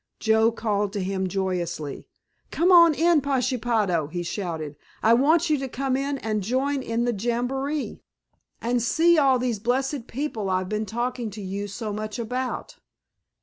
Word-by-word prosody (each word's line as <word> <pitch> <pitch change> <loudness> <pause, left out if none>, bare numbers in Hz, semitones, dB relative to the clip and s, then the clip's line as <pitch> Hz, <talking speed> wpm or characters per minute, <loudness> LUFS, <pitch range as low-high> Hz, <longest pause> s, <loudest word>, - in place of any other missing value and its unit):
Joe 220 +1 +3
called 210 -3 -1
to 205 - -2
him 190 0 -1
joyously. 175 -6 -3 0.4
"Come 350 +3 +2
on 335 -2 +8
in - - -13
here, 335 -2 +4
Pashepaho," 235 - 0
he 175 +3 -4
shouted, 165 -5 -4 0.3
"I 225 - +6
want 310 +6 +3
you 300 - +2
to 270 - -3
come 265 +1 -1
in 275 +1 -1
and 215 -4 -2
join 265 +7 0
in 235 -1 -1
the 240 - +1
jamboree, 245 +7 -2 0.6
and 240 +1 +1
see 325 +8 +4
all 270 -3 +4
these 245 -4 -1
blessed 255 +3 -1
people 235 -7 -3
I've 185 0 0
been 215 0 -2
talking 240 +1 -2
to 210 +1 -8
you 200 +2 -4
so 210 +1 -5
much 215 +2 -4
about." 250 +2 -4
235 Hz, 165 wpm, -25 LUFS, 205-270 Hz, 0.6 s, on